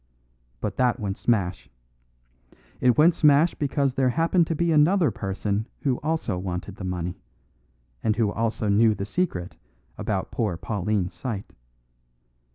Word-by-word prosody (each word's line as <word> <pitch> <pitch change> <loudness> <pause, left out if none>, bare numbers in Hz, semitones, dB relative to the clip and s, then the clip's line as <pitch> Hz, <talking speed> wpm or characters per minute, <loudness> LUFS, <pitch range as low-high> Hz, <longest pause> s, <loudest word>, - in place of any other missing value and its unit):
"But 105 -2 -3
that 125 -1 +2
went 100 -3 -2
smash. 100 -7 0 1.1
It 125 +1 +3
went 165 +3 +6
smash 150 0 +4
because 140 -2 0
there 130 -1 +2
happened 165 +5 +2
to 165 - -1
be 170 +2 +1
another 160 - +4
person 100 +2 -2
who 135 -4 0
also 150 - -2
wanted 90 +2 -5
the - - -7
money, 90 -1 -4 0.8
and 110 - +2
who 110 -3 +1
also 115 -1 -1
knew 110 +2 +4
the 100 - -4
secret 105 - -2 0.4
about - - -2
poor 105 -7 -1
Pauline's 100 -1 -2
sight. 100 +2 -5
115 Hz, 140 wpm, -25 LUFS, 100-145 Hz, 1.1 s, went